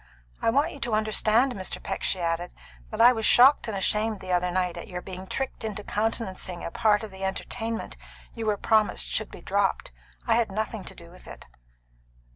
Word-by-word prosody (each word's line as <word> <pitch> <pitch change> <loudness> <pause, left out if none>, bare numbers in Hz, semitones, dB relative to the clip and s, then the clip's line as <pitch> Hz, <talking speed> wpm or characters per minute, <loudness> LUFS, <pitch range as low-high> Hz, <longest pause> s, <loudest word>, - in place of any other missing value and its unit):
I - - +2
want 285 +8 +2
you 285 - -10
to 235 -4 -1
understand, 220 +4 +2
Mr. 190 -3 -5
Peck," - - -4
she 190 - 0
added, 170 +1 -2 0.4
"that 215 - -6
I 240 +2 +8
was 225 -2 -3
shocked 255 +5 +6
and 210 -3 -3
ashamed 210 +2 0
the 185 -1 -6
other 180 0 +2
night 180 -1 0
at - - -8
your 180 -2 -5
being 185 +1 -8
tricked 270 +1 -4
into 210 -2 -4
countenancing 205 -5 -3
a - - -4
part 210 +2 +2
of 215 - -7
the 190 0 -9
entertainment 225 +4 -4 0.4
you 225 -2 -4
were 210 -1 +2
promised 215 +1 +2
should - - -2
be - - -11
dropped. - - 0 0.3
I 230 -1 +3
had 230 -4 +1
nothing 215 0 -3
to - - -7
do 170 0 -14
with 180 - -15
it." - - -11
215 Hz, 205 wpm, -26 LUFS, 185-225 Hz, 0.4 s, I